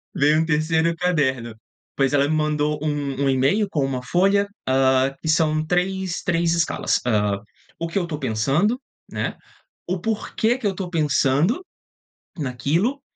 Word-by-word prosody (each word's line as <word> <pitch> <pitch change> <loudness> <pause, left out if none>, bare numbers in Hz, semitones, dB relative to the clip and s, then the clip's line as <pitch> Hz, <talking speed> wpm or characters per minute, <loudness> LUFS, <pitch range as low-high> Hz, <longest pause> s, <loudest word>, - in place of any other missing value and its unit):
Vem 150 +2 +4
um 160 - +1
3º 160 +1 +1
caderno, 140 -10 0 0.4
pois 135 -1 +1
ela 140 0 +3
me 155 - 0
mandou 150 -1 0
um 145 -2 -1
um - - +3
e-mail 135 +11 +2
com 145 -6 0
1 130 -2 -3
folha, 195 +8 +2 0.2
ah, 130 0 +3
que - - -6
são 155 -1 +2
3, 180 +1 -1
3 170 -1 +1
escalas, 170 -1 +1
hã, 105 -4 +1 0.4
“O 165 - -3
que 165 - -3
eu 175 - -2
tô 155 -3 -4
pensando?”, 140 - +1 0.3
né, - - -3 0.5
“O 180 +1 -1
porquê 225 +3 0
que 255 - -8
eu 195 - 0
tô 185 -1 -4
pensando 155 - +1 0.7
naquilo”, 160 - -1
155 Hz, 155 wpm, -22 LUFS, 135-180 Hz, 0.7 s, Vem